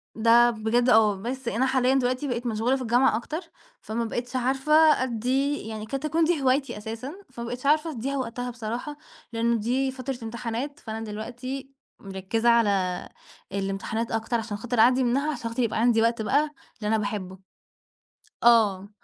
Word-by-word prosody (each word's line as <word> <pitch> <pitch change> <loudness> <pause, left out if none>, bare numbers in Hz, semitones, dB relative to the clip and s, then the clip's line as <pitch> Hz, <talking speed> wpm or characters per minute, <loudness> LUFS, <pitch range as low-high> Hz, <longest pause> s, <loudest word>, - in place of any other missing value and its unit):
ده 235 +2 +5
بجد 235 +3 +1
آه، 215 -3 +5
بس 255 +2 -5
أنا 235 +3 +1
حاليًا 260 0 +2
دلوقتي 255 +2 0
بقيت 245 -1 -3
مشغولة 230 +3 +1
في 265 - -4
الجامعة 240 -1 +3
أكتر 310 +8 -5 0.4
فما 230 +2 -3
بقيتش 245 +3 -4
عارفة 265 +4 0 0.3
أدّي 260 +4 0
يعني 215 -1 -5
قد 270 +4 -3
تكون 310 +3 0
دي 325 -2 +1
هوايتي 270 -1 +1
أساسًا 225 +6 -6 0.2
فما 235 -1 -6
بقيتش 245 +3 -6
عارفة 310 +3 +3
أدّيها 275 +1 -3
وقتها 245 0 -3
بصراحة 240 +5 -5 0.4
لإنه 235 +1 +1
دي 260 +4 0
فترة 260 0 -5
إمتحانات 235 +5 -4
فأنا 220 -1 -6
دلوقتي 245 +5 -6 0.3
مركّزة 195 +4 -1
على 200 -6 +2 0.4
الإمتحانات 195 +4 -3
أكتر 225 +1 0
عشان 220 -2 -5
خاطر 245 +2 -3
أعدّي 255 +3 +5
منها 275 +5 +1
عشان 235 -4 -4
خاطر 240 +2 -1
يبقى 220 -1 -1
عندي 230 -1 +4
وقت 230 0 +1
بقى 285 +7 +2 0.4
للي 210 - -2
أنا 220 +1 +2
باحبّه. 200 -3 -4 1.1
آه، 210 -5 +4
235 Hz, 165 wpm, -26 LUFS, 220-260 Hz, 1.1 s, ده